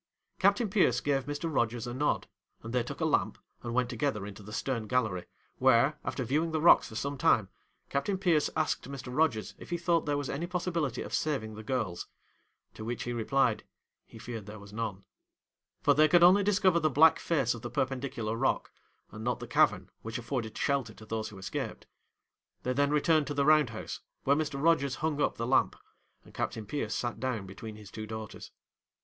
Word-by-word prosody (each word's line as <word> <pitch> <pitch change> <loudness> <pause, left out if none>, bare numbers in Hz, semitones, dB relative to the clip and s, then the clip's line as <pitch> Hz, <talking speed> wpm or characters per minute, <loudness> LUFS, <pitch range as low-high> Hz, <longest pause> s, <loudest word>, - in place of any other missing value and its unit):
Captain 200 +4 +3
Pierce 185 - +3
gave 135 -1 0
Mr. 145 +3 -3
Rogers 120 -2 0
a 120 - -5
nod, 145 +4 0 0.4
and 115 +1 -6
they 125 - +2
took 120 - -6
a - - +2
lamp - - +1 0.2
and 120 0 -4
went 125 -1 +2
together 120 -4 -2
into 105 0 -9
the 105 +1 -11
stern 115 -1 -2
gallery, 110 -7 0 0.3
where, - - +4
after - - -2
viewing 155 +5 0
the 160 -1 -1
rocks 170 - +6
for 110 - -10
some 140 +4 -3
time, 105 -6 +3 0.4
Captain 165 +8 -1
Pierce 175 -6 +2
asked 155 -3 -1
Mr. 130 -2 -7
Rogers 150 -9 +1
if - - -11
he 175 - -1
thought 170 -2 +1
there 145 -1 +1
was 145 -1 -3
any 160 +5 -3
possibility 170 -6 -2
of - - -8
saving 135 -8 -1
the 110 - -8
girls; 110 -7 -2 0.7
to - - -8
which 120 +2 -3
he 120 - -3
replied, 120 0 +1 0.4
he - - -13
feared 110 -2 -7
there 105 +1 -8
was 100 0 -13
none; 105 -4 -4 0.8
for - - +5
they 155 +1 +5
could 175 +2 +5
only 185 +3 +7
discover 190 -3 +3
the 155 -1 +2
black 155 +3 +6
face 135 -8 +1
of 120 - -8
the 120 - -5
perpendicular 125 -3 -2
rock, 130 +3 0 0.4
and 110 - -8
not 125 +1 -1
the - - -6
cavern - - +2
which 115 +1 -5
afforded 120 -2 -4
shelter 135 -6 0
to 110 - -13
those 110 0 -3
who 105 - -12
escaped. 95 - -5 0.8
They 125 - 0
then 140 +2 +2
returned 150 0 +3
to 145 - -3
the 140 0 +2
round 150 -4 +5
house, 110 - -6 0.2
where 140 - +4
Mr. 145 -2 -2
Rogers 140 -4 +3
hung 155 -2 -1
up - - +1
the 115 - -2
lamp, 130 +2 +3 0.5
and - - -16
Captain 110 -1 -3
Pierce 110 -1 -3
sat 120 -3 -3
down 120 -5 -2
between 105 +3 -8
his 105 -1 -12
two 110 -1 -6
daughters. 110 -1 -7
130 Hz, 205 wpm, -30 LUFS, 110-150 Hz, 0.8 s, only